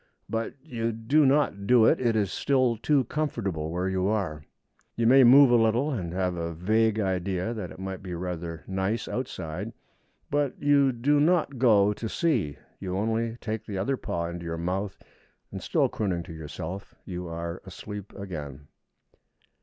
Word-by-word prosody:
But 115 0 -3
you 115 -1 -2
do 135 +7 +3
not 135 -8 +2
do 120 -2 +6
it. - - +4
It 120 -3 +2
is 100 -3 +1
still 130 -4 +2
too 135 +5 +2
comfortable 105 - -2
where 90 +3 -1
you 95 0 0
are. 95 -8 -1 0.5
You 115 - 0
may 130 +3 +7
move 130 +2 +8
a - - +6
little, 120 +7 +2
and 90 - -3
have 90 0 -1
a 85 -1 -4
vague 110 +5 +2
idea 95 +1 -1
that 105 -6 -5
it - - -11
might 95 +1 -5
be 90 -3 -5
rather 85 -2 -5
nice 95 +4 -1
outside. 105 -4 -4 0.6
But 145 -2 0
you 140 -2 +4
do 135 +5 +2
not 155 -4 +2
go 105 -5 +5
to 110 +2 -5
see; 125 - 0 0.2
you 95 -1 -3
only 115 +2 -1
take 110 0 -3
the 100 -3 -4
other 105 +9 0
paw 85 -8 -3
into 85 0 -5
your 85 -1 -4
mouth, 95 +4 -2 0.5
and, - - -6
still - - +2
crooning 90 -5 -2
to 80 - -9
yourself, 80 +4 -7
you 90 -1 -5
are 85 +1 -5
asleep 100 +1 -8
again. 75 -8 -7
100 Hz, 170 wpm, -27 LUFS, 90-120 Hz, 0.6 s, move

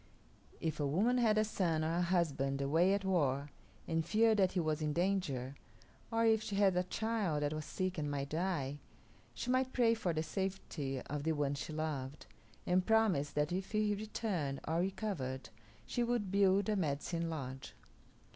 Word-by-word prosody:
If 155 -2 -2
a 145 - +1
woman 220 - +2
had 220 -3 +3
a 215 - +5
son 175 -7 0
or 165 +2 0
a - - +2
husband 150 -7 +1
away 165 +8 +3
at 200 -1 -3
war 145 -6 +1 0.4
and 165 -1 +1
feared 220 +4 +3
that 190 -2 +3
he 185 - +1
was 155 -2 0
in 150 -1 0
danger, 170 -8 0 0.6
or 230 0 +2
if 220 -1 +4
she 210 - -4
had 195 -2 +4
a 180 - +3
child 190 -5 -1
that 145 +1 0
was 155 -1 -4
sick 185 -2 -2
and 150 -1 -2
might 140 -1 -3
die, 155 -4 -1 0.6
she 250 - -2
might 255 0 +1
pray 235 -3 +4
for 220 -6 -1
the 160 -1 -1
safety 160 -6 -3
of 145 +1 -4
the 160 +2 +1
one 145 -2 0
she 145 +2 -5
loved, 150 -3 -4 0.4
and 180 +1 +3
promise 215 -11 +3
that 150 +1 0
if 185 +4 -3
he 215 -1 +2
returned 200 -9 -2
or 160 +2 +1
recovered 185 - -3 0.4
she 245 - -2
would 235 -5 0
build 195 0 +4
a 215 - +1
Medicine 165 0 -1
Lodge. 135 -4 -6
175 Hz, 185 wpm, -35 LUFS, 145-200 Hz, 0.6 s, a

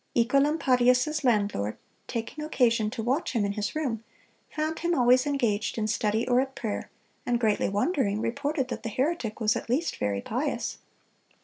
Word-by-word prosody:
Œcolampadius's 265 +2 +3
landlord, 205 - +1 0.3
taking 235 +6 -4
occasion 235 -8 +2
to 225 0 -5
watch 265 +7 0
him 220 -4 +1
in 200 - -1
his 205 +4 -3
room, 250 -8 -2 0.5
found 310 +1 -2
him 345 +1 +1
always 255 +1 +4
engaged 235 -8 0
in 220 - 0
study 215 +1 0
or 250 0 +4
at 265 0 -5
prayer, 220 -3 -4 0.3
and 240 -1 0
greatly 220 -3 +1
wondering, 210 - 0
reported 280 +3 -1
that - - -4
the 225 - -4
heretic 255 -2 -1
was 220 +1 +2
at 235 - -5
least 290 +8 0
"very 100 -1 -1
pious." - - -2
245 Hz, 165 wpm, -27 LUFS, 215-280 Hz, 0.5 s, always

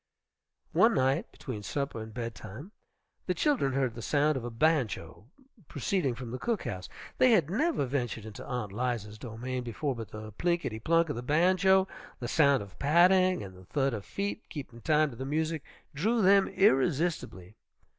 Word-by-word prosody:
One 225 0 +4
night, 135 +5 +1
between 120 -6 -7
supper 140 +1 -3
and 110 0 -8
bedtime, 115 - -7 0.6
the - - 0
children 270 - +1
heard 130 -3 0
the 115 - -8
sound 150 +4 +2
of 130 - -3
a 120 - -4
banjo 115 - 0 0.4
proceeding 145 -2 -1
from 120 -1 -7
the 125 - -5
cook 230 -4 -1
house. 95 -2 -5 0.3
They 255 -2 +6
had 170 -7 +3
never 300 - +1
ventured 120 -4 -3
into 110 -2 -8
Aunt 120 -5 -4
'Liza's 110 -2 -3
domain 125 +3 -4
before, 125 +4 -3
but 115 -4 -7
the 110 0 -8
plinketty 170 - -1
plunk 165 +6 +2
of 145 - -2
the 120 - -4
banjo, 185 +7 +3 0.3
the 120 - -4
sound 140 -3 +3
of 100 - -15
patting 180 - +4
and 95 -2 -9
the 90 0 -15
thud 135 +4 0
of 105 -3 -4
feet 200 - -3
keeping 125 -6 -8
time 155 +1 +2
to - - -10
the 130 - -5
music 155 +3 -1 0.3
drew 215 +10 +1
them 195 +1 +6
irresistibly. 135 - +1
135 Hz, 175 wpm, -30 LUFS, 115-170 Hz, 0.6 s, They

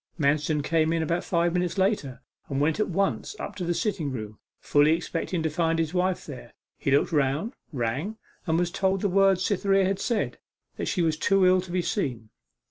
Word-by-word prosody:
Manston 150 +1 +1
came 160 +1 +2
in 165 -1 +1
about 170 +3 -1
five 170 -1 +1
minutes 180 +1 -1
later, 190 - 0 0.3
and 135 - -1
went 155 +6 +1
at 215 - +1
once 195 - -1
up 205 - -5
to 185 - -3
the 175 0 0
sitting 180 -10 -1
room, 110 -4 -6 0.2
fully 145 +2 +4
expecting 170 0 -3
to 160 - +1
find 165 +1 +1
his 165 0 -1
wife 185 0 0
there. 130 -5 -10 0.2
He - - -1
looked 140 +1 +3
round, 150 - 0 0.2
rang, 140 - -2 0.3
and 160 0 +2
was 175 0 0
told 190 0 0
the - - +2
words 195 0 +3
Cytherea 195 -1 +2
had 195 +1 0
said, 235 0 -1 0.4
that - - -3
she 180 - 0
was 160 -2 +1
too 195 +3 +3
ill 185 0 +5
to 180 -1 -10
be 180 0 0
seen. 125 - -3
170 Hz, 205 wpm, -26 LUFS, 150-190 Hz, 0.4 s, ill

